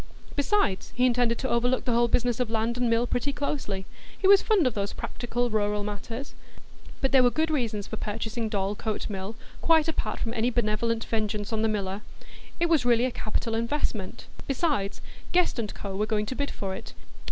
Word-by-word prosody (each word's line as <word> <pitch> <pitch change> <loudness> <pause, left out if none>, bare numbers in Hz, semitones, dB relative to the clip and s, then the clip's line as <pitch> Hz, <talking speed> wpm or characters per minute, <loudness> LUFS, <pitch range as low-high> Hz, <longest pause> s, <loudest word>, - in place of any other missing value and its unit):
Besides, 285 - +1
he 250 - +4
intended 240 -2 +3
to 260 - -2
overlook 245 +2 +1
the 245 - +1
whole 235 +1 +4
business 240 0 +1
of 250 -3 0
land 225 +1 0
and 245 -1 +1
mill 230 +1 +3
pretty 245 +3 0
closely; 270 -9 -3 0.3
he 380 - +2
was 395 0 +8
fond 415 -8 +3
of 255 - +2
these 200 -1 -2
practical 240 0 -2
rural 210 -1 +1
matters. 225 +6 -5 0.7
But 270 - +1
there 265 - +7
were 245 - +6
good 315 +5 0
reasons 225 -8 -1
for - - -5
purchasing 220 +2 -3
Dorlcote 205 +1 -2
Mill, 195 +2 -4 0.3
quite 320 -1 +4
apart 320 - -2
from 230 - -2
any 235 +1 +2
benevolent 230 -1 0
vengeance 215 -1 -1
on 220 - +1
the 225 - +3
miller. 200 -1 -2 0.6
It 340 - +3
was 320 -6 +3
really 240 0 +4
a 255 - 0
capital 225 0 -2
investment; 225 -4 -2 0.2
besides, 275 - 0 0.3
Guest 355 -8 +3
&Co. 195 -1 -5
were 210 +2 0
going 210 -1 +1
to 255 - -4
bid 285 +1 -1
for 195 -1 -4
it. - - -8
230 Hz, 190 wpm, -27 LUFS, 210-255 Hz, 0.7 s, was